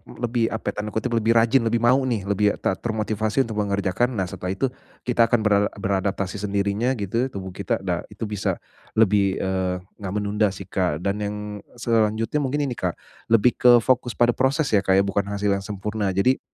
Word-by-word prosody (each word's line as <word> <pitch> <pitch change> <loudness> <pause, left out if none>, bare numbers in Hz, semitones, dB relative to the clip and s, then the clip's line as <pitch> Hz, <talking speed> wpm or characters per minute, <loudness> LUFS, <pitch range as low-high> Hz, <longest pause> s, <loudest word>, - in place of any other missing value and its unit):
lebih, 120 -1 0
apa, 110 - -3
tanda 105 0 -6
kutip 110 +3 -1
"lebih 115 0 +2
rajin", 115 +3 +5
lebih 115 +1 0
mau 125 +3 +5
nih, 115 -6 -1
lebih 100 +1 +1
ter - - -1
termotivasi 110 +1 0
untuk 110 -3 -4
mengerjakan. 100 +4 0
Nah, 95 - 0
setelah 90 +1 -4
itu 130 +6 -1 0.3
kita 120 -2 +3
akan 115 -1 +2
bera 105 -1 +3
beradaptasi 100 0 -2
sendirinya, 100 +5 0
gitu, 115 +4 -1
tubuh 95 -7 -7
kita 95 +1 -3
dah, 90 -2 -1
itu 105 +1 -9
bisa 105 -2 -2 0.3
lebih, 100 -3 +3
eee, 95 -1 -2 0.2
nggak 95 -2 -5
menunda 105 +1 +1
sih, - - -7
Kak. 90 -4 -1
Dan 100 +1 -1
yang 105 0 -3 0.4
selanjutnya 115 +2 +1
mungkin 145 +1 0
ini, 140 - -2
Kak, 90 -7 -2 0.3
lebih 115 +1 +3
ke 125 - +7
fokus 125 -1 +1
pada 120 0 +4
proses 135 +5 +1
ya, 105 - +5
Kak, 95 -1 +2
ya, 95 - +5
bukan 100 0 -1
hasil 100 0 -1
yang 100 - +1
sempurna. 105 +1 -3
Jadi 125 +7 +3
105 Hz, 190 wpm, -23 LUFS, 100-115 Hz, 0.4 s, ke